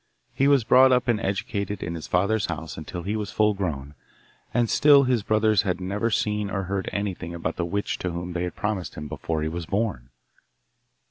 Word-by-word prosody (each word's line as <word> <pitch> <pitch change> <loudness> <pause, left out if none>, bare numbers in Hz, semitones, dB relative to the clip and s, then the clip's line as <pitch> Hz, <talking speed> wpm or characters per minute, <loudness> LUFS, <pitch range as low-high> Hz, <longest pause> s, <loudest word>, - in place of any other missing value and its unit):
He 135 - +2
was 140 -4 +5
brought 130 +3 +6
up 125 -1 +2
and 115 -3 +2
educated 100 0 -2
in 85 - -3
his 80 -2 -6
father's 100 +4 +1
house 80 -1 -5
until 85 +3 -6
he 100 +4 -2
was 105 -2 -3
full 105 0 +3
grown, 75 -8 -4 0.6
and 120 -1 +2
still 145 +3 +6
his 125 -3 +1
brothers 110 0 +3
had 95 -4 -1
never 100 +5 -1
seen 105 -2 0
or 100 -1 -2
heard 95 +1 -2
anything 95 -4 -3
about 85 - -3
the 85 - -2
witch 100 +4 -2
to 90 - -2
whom 85 +1 -5
they 85 - -2
had 90 - -6
promised 105 -4 -3
him 75 0 -6
before 80 +1 -3
he - - 0
was 85 0 -5
born. 100 - -2
100 Hz, 205 wpm, -25 LUFS, 85-110 Hz, 0.6 s, brought